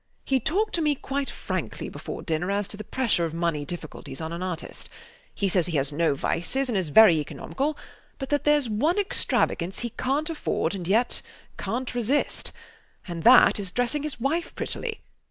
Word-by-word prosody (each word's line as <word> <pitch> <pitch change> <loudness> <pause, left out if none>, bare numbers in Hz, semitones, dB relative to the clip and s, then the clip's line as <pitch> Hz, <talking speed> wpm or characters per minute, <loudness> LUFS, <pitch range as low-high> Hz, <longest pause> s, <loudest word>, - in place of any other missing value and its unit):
He 265 -1 +2
talked 405 - 0
to 335 - +1
me 300 -2 +2
quite 275 +1 -3
frankly - - -4
before - - -7
dinner 165 +2 -1
as 200 0 0
to - - -3
the 215 - -7
pressure 230 -6 +1
of 165 -1 -2
money 165 -4 -1
difficulties 155 -4 -7
on 160 0 -4
an 170 - -5
artist. 180 -3 -5 0.5
He 200 - 0
says 180 -2 +3
he 165 -3 0
has 135 +1 +1
no 160 -1 +2
vices 260 - 0
and 235 - -1
is 185 -5 0
very 195 0 +8
economical, 275 - -3 0.4
but 270 -1 -5
that 290 -1 +1
theres 295 -3 +4
one 275 - +1
extravagance 190 - +1
he 240 -1 -3
cant 275 +7 -1
afford 250 - -1
and 180 -4 -5
yet 225 +6 +2 0.4
cant 250 +2 -3
resist; 245 +4 0 0.6
and 170 -2 -5
that 245 +1 +7
is 195 -2 -2
dressing 245 +8 0
his 300 -3 -3
wife 315 +7 -1
prettily. 450 -2 -3
220 Hz, 185 wpm, -26 LUFS, 170-280 Hz, 0.6 s, very